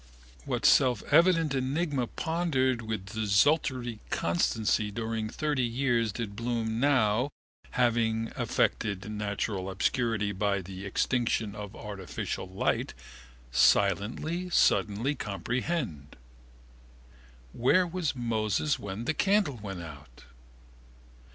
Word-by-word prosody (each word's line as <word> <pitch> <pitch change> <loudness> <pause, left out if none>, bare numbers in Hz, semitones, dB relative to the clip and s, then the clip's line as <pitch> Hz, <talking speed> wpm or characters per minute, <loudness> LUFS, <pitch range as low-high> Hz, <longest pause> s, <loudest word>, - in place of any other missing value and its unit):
What - - -2
selfevident 155 - +4
enigma 135 0 -1
pondered 140 -8 0
with 110 -3 -5
desultory 120 +2 +2
constancy 105 +5 +1
during 110 0 -3
30 150 +1 -1
years 120 -2 +1
did 105 -1 -5
Bloom 115 -1 -2
now, 125 -2 +3 0.5
having 115 -2 +1
effected 100 0 -1
natural 100 -2 -2
obscurity 105 +2 0
by 100 0 0
the 95 +2 -7
extinction 115 0 0
of 105 -1 -8
artificial 100 -2 -5
light, 95 - -1 0.6
silently 105 - +2
suddenly 115 - +2
comprehend? 120 - -3 1.4
Where 150 +10 +3
was 175 -4 -2
Moses 115 +3 0
when 100 +3 -5
the 155 - +1
candle 195 - +2
went 95 -4 -6
out? 70 -6 -12
115 Hz, 95 wpm, -29 LUFS, 100-135 Hz, 1.4 s, selfevident